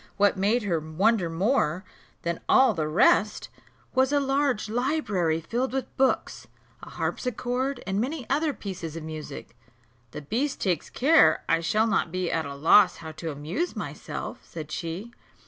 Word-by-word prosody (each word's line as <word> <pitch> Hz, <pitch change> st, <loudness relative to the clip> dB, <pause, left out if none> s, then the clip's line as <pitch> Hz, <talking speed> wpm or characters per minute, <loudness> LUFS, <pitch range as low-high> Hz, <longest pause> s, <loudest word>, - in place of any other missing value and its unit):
What 205 Hz, 0 st, +4 dB
made 210 Hz, +5 st, +1 dB
her 175 Hz, -5 st, 0 dB
wonder 175 Hz, +5 st, +1 dB
more 185 Hz, -, +1 dB, 0.4 s
than 170 Hz, 0 st, -2 dB
all 260 Hz, -3 st, +6 dB
the 155 Hz, -5 st, -2 dB
rest 190 Hz, +6 st, +3 dB, 0.4 s
was 260 Hz, +1 st, +3 dB
a 290 Hz, -, +3 dB
large 275 Hz, -5 st, 0 dB
library 215 Hz, -, 0 dB
filled 245 Hz, +10 st, -2 dB
with 265 Hz, -2 st, -4 dB
books, 265 Hz, 0 st, 0 dB, 0.3 s
a -, -, -10 dB
harpsichord, 250 Hz, +2 st, -2 dB
and 195 Hz, +1 st, -1 dB
many 265 Hz, -1 st, -3 dB
other 300 Hz, +3 st, +1 dB
pieces 180 Hz, -, -6 dB
of 165 Hz, -, -6 dB
music. 155 Hz, -6 st, -8 dB, 0.5 s
"The 150 Hz, -, -8 dB
beast 255 Hz, -, -1 dB
takes 180 Hz, -6 st, -1 dB
care 310 Hz, +5 st, +4 dB
I 165 Hz, 0 st, +2 dB
shall 215 Hz, +7 st, +2 dB
not 220 Hz, -6 st, 0 dB
be 185 Hz, -1 st, -2 dB
at 160 Hz, -3 st, -1 dB
a 140 Hz, -, -7 dB
loss 175 Hz, +6 st, +5 dB
how 160 Hz, -1 st, -8 dB
to 160 Hz, +1 st, -6 dB
amuse 155 Hz, -, -3 dB
myself," -, -, -6 dB
said 155 Hz, -2 st, -8 dB
she. 170 Hz, +9 st, -5 dB
200 Hz, 160 wpm, -26 LUFS, 165-255 Hz, 0.5 s, all